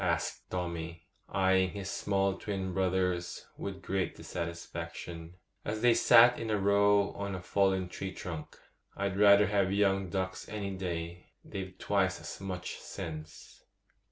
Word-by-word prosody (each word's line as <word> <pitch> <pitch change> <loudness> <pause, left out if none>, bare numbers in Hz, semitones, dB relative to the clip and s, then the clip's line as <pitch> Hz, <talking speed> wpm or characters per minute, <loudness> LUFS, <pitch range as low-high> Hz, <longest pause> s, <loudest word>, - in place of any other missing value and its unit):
asked 85 -2 -1
Tommy, 85 -2 -4 0.3
eyeing 95 -1 +3
his 100 0 -6
small 100 -1 +1
twin 95 -2 -3
brothers 90 -2 0
with 95 -1 -6
great 95 0 -1
dissatisfaction, 85 0 -6 0.3
as 110 +1 -3
they 120 -1 +6
sat 120 +2 +7
in 115 - -3
a 105 - +2
row 100 0 +4
on 100 -1 -4
a - - -4
fallen 95 0 +1
tree 95 +1 -5
trunk. 85 -5 -7 0.4
'I'd 100 -1 -1
rather 100 0 +7
have 100 -1 +2
young 95 -2 +2
ducks 95 0 -3
any 100 -2 -3
day; 85 -2 -5 0.2
they've 95 -1 -6
twice 95 -2 +1
as - - -8
much 90 -2 -5
sense. 80 -1 -8
95 Hz, 140 wpm, -31 LUFS, 90-100 Hz, 0.4 s, sat